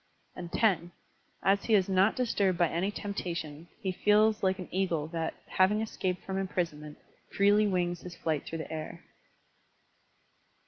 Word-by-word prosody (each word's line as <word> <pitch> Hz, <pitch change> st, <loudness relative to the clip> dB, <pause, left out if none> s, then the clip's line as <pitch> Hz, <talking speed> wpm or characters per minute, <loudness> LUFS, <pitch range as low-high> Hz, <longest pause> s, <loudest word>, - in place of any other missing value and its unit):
(lo) 175 Hz, -1 st, -7 dB, 0.9 s
As 200 Hz, +1 st, +2 dB
he 225 Hz, -, +4 dB
is 190 Hz, -3 st, +3 dB
not 190 Hz, +2 st, +3 dB
disturbed 200 Hz, -7 st, +1 dB
by 175 Hz, -1 st, +4 dB
any 175 Hz, +4 st, 0 dB
temptation, 170 Hz, -6 st, -5 dB
he 190 Hz, -4 st, -1 dB
feels 210 Hz, +3 st, +3 dB
like 190 Hz, -1 st, +2 dB
an 185 Hz, -, -7 dB
eagle 180 Hz, -5 st, 0 dB
that, 165 Hz, -1 st, -3 dB
having 190 Hz, +3 st, +2 dB
escaped 185 Hz, -4 st, -2 dB
from 190 Hz, 0 st, -2 dB
imprisonment, 165 Hz, -6 st, -3 dB, 0.4 s
freely 205 Hz, +1 st, +5 dB
wings 175 Hz, -2 st, -1 dB
his 180 Hz, -1 st, -9 dB
flight 155 Hz, -4 st, -1 dB
through 165 Hz, -, -5 dB
the 160 Hz, -, -6 dB
air. 155 Hz, -1 st, -6 dB
185 Hz, 145 wpm, -30 LUFS, 170-200 Hz, 0.9 s, freely